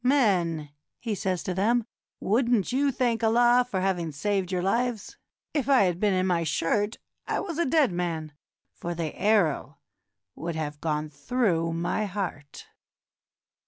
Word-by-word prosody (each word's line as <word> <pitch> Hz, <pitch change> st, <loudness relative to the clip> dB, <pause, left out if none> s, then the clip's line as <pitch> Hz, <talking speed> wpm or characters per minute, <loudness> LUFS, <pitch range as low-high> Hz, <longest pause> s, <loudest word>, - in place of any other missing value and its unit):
"Men," 180 Hz, -, +2 dB, 0.3 s
he 230 Hz, -3 st, -3 dB
says 185 Hz, -2 st, -2 dB
to 185 Hz, -, -2 dB
them, 225 Hz, +5 st, +2 dB, 0.3 s
"would 235 Hz, +4 st, +1 dB
n't 220 Hz, -4 st, +2 dB
you 275 Hz, +2 st, +2 dB
thank 240 Hz, -2 st, 0 dB
Allah 240 Hz, +2 st, +5 dB
for 190 Hz, -5 st, -1 dB
having 180 Hz, -4 st, 0 dB
saved 190 Hz, +4 st, -1 dB
your 180 Hz, -1 st, -1 dB
lives? 230 Hz, +1 st, -1 dB, 0.4 s
If 280 Hz, -3 st, -1 dB
I 265 Hz, -6 st, +6 dB
had 180 Hz, -2 st, 0 dB
been 205 Hz, -2 st, +2 dB
in 185 Hz, 0 st, +1 dB
my 175 Hz, -2 st, +1 dB
shirt, 205 Hz, +7 st, 0 dB, 0.3 s
I -, -, 0 dB
was 335 Hz, -4 st, -4 dB
a 340 Hz, -, +2 dB
dead 290 Hz, -, +3 dB
man, 165 Hz, -3 st, -3 dB, 0.4 s
for 175 Hz, 0 st, -5 dB
the 160 Hz, -2 st, -3 dB
arrow 170 Hz, -9 st, +1 dB, 0.6 s
would 170 Hz, 0 st, -5 dB
have 150 Hz, -2 st, -4 dB
gone 150 Hz, -1 st, -1 dB
through 170 Hz, -, 0 dB
my 175 Hz, +5 st, -1 dB
heart." 180 Hz, -7 st, -5 dB
190 Hz, 160 wpm, -27 LUFS, 170-235 Hz, 0.6 s, I